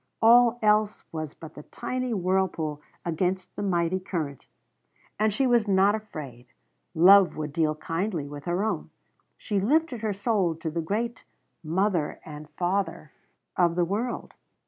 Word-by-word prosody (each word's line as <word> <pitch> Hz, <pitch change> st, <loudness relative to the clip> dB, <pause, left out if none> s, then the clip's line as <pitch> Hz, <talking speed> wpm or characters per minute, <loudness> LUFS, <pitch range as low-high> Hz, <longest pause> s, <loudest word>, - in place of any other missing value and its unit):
All 240 Hz, +1 st, +6 dB
else 210 Hz, 0 st, +2 dB
was 155 Hz, -2 st, -5 dB
but 160 Hz, -1 st, -11 dB
the -, -, -10 dB
tiny 255 Hz, +10 st, -4 dB
whirlpool 180 Hz, -6 st, -1 dB, 0.2 s
against 180 Hz, +2 st, -2 dB
the -, -, -4 dB
mighty 180 Hz, -2 st, 0 dB
current. 160 Hz, -7 st, -5 dB, 0.7 s
And 215 Hz, 0 st, +3 dB
she 265 Hz, +7 st, +1 dB
was 240 Hz, -4 st, +3 dB
not 195 Hz, +1 st, +4 dB
afraid. 150 Hz, -, -7 dB, 0.5 s
Love 190 Hz, +3 st, +7 dB
would 150 Hz, -2 st, -4 dB
deal 155 Hz, -1 st, +1 dB
kindly 165 Hz, 0 st, -3 dB
with 145 Hz, 0 st, -9 dB
her 175 Hz, +3 st, 0 dB
own. 220 Hz, -, -2 dB, 0.5 s
She 205 Hz, -2 st, -1 dB
lifted 275 Hz, +3 st, +1 dB
her 220 Hz, -1 st, -1 dB
soul 195 Hz, -4 st, 0 dB
to 160 Hz, 0 st, -5 dB
the 165 Hz, +1 st, -2 dB
great 225 Hz, +8 st, -3 dB, 0.4 s
Mother 175 Hz, 0 st, 0 dB
and 150 Hz, -1 st, -9 dB
Father 175 Hz, -4 st, -1 dB, 0.4 s
of 170 Hz, -2 st, +2 dB
the 175 Hz, -1 st, +2 dB
world. 220 Hz, +7 st, -3 dB
185 Hz, 145 wpm, -26 LUFS, 160-215 Hz, 0.7 s, Love